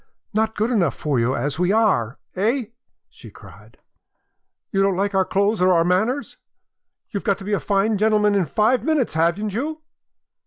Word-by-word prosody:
"Not 220 Hz, +1 st, 0 dB
good 220 Hz, +4 st, 0 dB
enough 175 Hz, -, +1 dB
for 145 Hz, -5 st, -1 dB
you 120 Hz, +3 st, +1 dB
as 145 Hz, +2 st, -3 dB
we 180 Hz, +1 st, +2 dB
are, 195 Hz, -, +1 dB, 0.2 s
eh?" 225 Hz, +5 st, 0 dB, 0.4 s
she -, -, -14 dB
cried. -, -, -16 dB, 0.9 s
"You 195 Hz, -, +1 dB
don't 195 Hz, -2 st, +1 dB
like 200 Hz, +1 st, -1 dB
our 190 Hz, -1 st, +2 dB
clothes 200 Hz, +1 st, 0 dB
or 185 Hz, 0 st, +4 dB
our 165 Hz, -1 st, +3 dB
manners! 215 Hz, +10 st, 0 dB, 0.7 s
You've 200 Hz, -, -4 dB
got 200 Hz, -2 st, +1 dB
to -, -, -10 dB
be 210 Hz, -, -2 dB
a 205 Hz, -, +1 dB
fine 200 Hz, +1 st, 0 dB
gentleman 210 Hz, -1 st, +3 dB
in 195 Hz, -3 st, +2 dB
five 220 Hz, -, +1 dB
minutes, 295 Hz, -, 0 dB
haven't 170 Hz, +6 st, 0 dB
you? 310 Hz, +7 st, -4 dB
200 Hz, 180 wpm, -21 LUFS, 180-220 Hz, 0.9 s, or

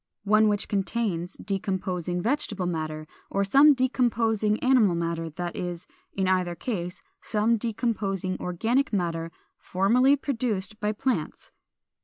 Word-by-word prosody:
One 215 Hz, +1 st, +4 dB
which 205 Hz, 0 st, 0 dB
contains 195 Hz, -3 st, -2 dB
decomposing 185 Hz, -3 st, -3 dB
vegetable 220 Hz, -7 st, -1 dB
matter, 155 Hz, -3 st, -3 dB, 0.2 s
or 200 Hz, -, 0 dB
some 275 Hz, +9 st, +6 dB
decomposing 230 Hz, -4 st, +1 dB
animal 245 Hz, -9 st, +4 dB
matter; 165 Hz, -1 st, -2 dB
that 175 Hz, +2 st, -5 dB
is, 175 Hz, -1 st, -5 dB, 0.3 s
in 190 Hz, -1 st, 0 dB
either 180 Hz, -2 st, +1 dB
case, 180 Hz, -3 st, -4 dB, 0.2 s
some 220 Hz, +1 st, +2 dB
decomposing 205 Hz, -5 st, -2 dB
organic 230 Hz, -, 0 dB
matter 165 Hz, -4 st, -2 dB, 0.3 s
formerly 240 Hz, +9 st, +3 dB
produced 225 Hz, -7 st, -3 dB
by 210 Hz, 0 st, 0 dB
plants. 245 Hz, +4 st, -3 dB
200 Hz, 120 wpm, -26 LUFS, 180-230 Hz, 0.3 s, some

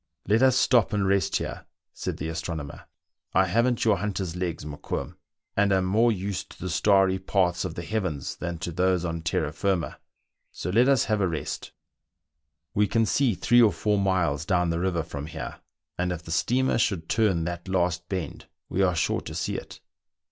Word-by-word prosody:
Let 110 Hz, +4 st, +3 dB
us 130 Hz, -1 st, +5 dB
stop 120 Hz, -3 st, +3 dB
and 100 Hz, -2 st, +1 dB
rest 100 Hz, 0 st, +2 dB
here," -, -, -3 dB, 0.3 s
said -, -, -4 dB
the 80 Hz, -, -4 dB
astronomer; 80 Hz, -3 st, -5 dB, 0.5 s
I 95 Hz, -, +5 dB
haven't 115 Hz, +6 st, +1 dB
your 110 Hz, -3 st, +4 dB
hunter's 95 Hz, -4 st, -3 dB
legs, 85 Hz, -4 st, -3 dB
Mokoum, 75 Hz, -1 st, -5 dB, 0.4 s
and 100 Hz, 0 st, +3 dB
am 95 Hz, -1 st, +3 dB
more 110 Hz, +5 st, +3 dB
used 100 Hz, -2 st, -3 dB
to -, -, -15 dB
the 90 Hz, 0 st, -4 dB
starry 95 Hz, +1 st, +3 dB
paths 95 Hz, -2 st, +1 dB
of 85 Hz, -, -5 dB
the 85 Hz, -, -5 dB
heavens 90 Hz, -8 st, -2 dB
than 85 Hz, -1 st, -4 dB
to 85 Hz, -, -4 dB
those 90 Hz, 0 st, +1 dB
on 85 Hz, -1 st, -3 dB
terra 80 Hz, -2 st, -1 dB
firma; 95 Hz, 0 st, -1 dB, 0.5 s
so 90 Hz, -, -4 dB
let 120 Hz, +7 st, +4 dB
us 135 Hz, -3 st, +4 dB
have 105 Hz, -1 st, 0 dB
a 95 Hz, -, +3 dB
rest; 80 Hz, -3 st, -4 dB, 1.0 s
we 105 Hz, 0 st, +3 dB
can 115 Hz, +3 st, +2 dB
see 125 Hz, -1 st, +2 dB
three 120 Hz, +5 st, +4 dB
or 110 Hz, -3 st, +6 dB
four 105 Hz, +4 st, 0 dB
miles 90 Hz, -7 st, +1 dB
down 90 Hz, -1 st, +1 dB
the 85 Hz, -, -1 dB
river 85 Hz, -2 st, 0 dB
from 75 Hz, -2 st, -6 dB
here, 80 Hz, -, -7 dB, 0.4 s
and 90 Hz, 0 st, 0 dB
if 85 Hz, -1 st, -5 dB
the 80 Hz, -, -8 dB
steamer 120 Hz, +9 st, +2 dB
should 95 Hz, -8 st, 0 dB
turn 100 Hz, -7 st, +2 dB
that 85 Hz, +2 st, -5 dB
last 90 Hz, -2 st, 0 dB
bend 90 Hz, -6 st, -4 dB, 0.2 s
we 95 Hz, -, 0 dB
are 90 Hz, -2 st, +3 dB
sure 80 Hz, -, 0 dB
to -, -, -8 dB
see -, -, -2 dB
it." -, -, -8 dB
95 Hz, 190 wpm, -26 LUFS, 85-105 Hz, 1.0 s, or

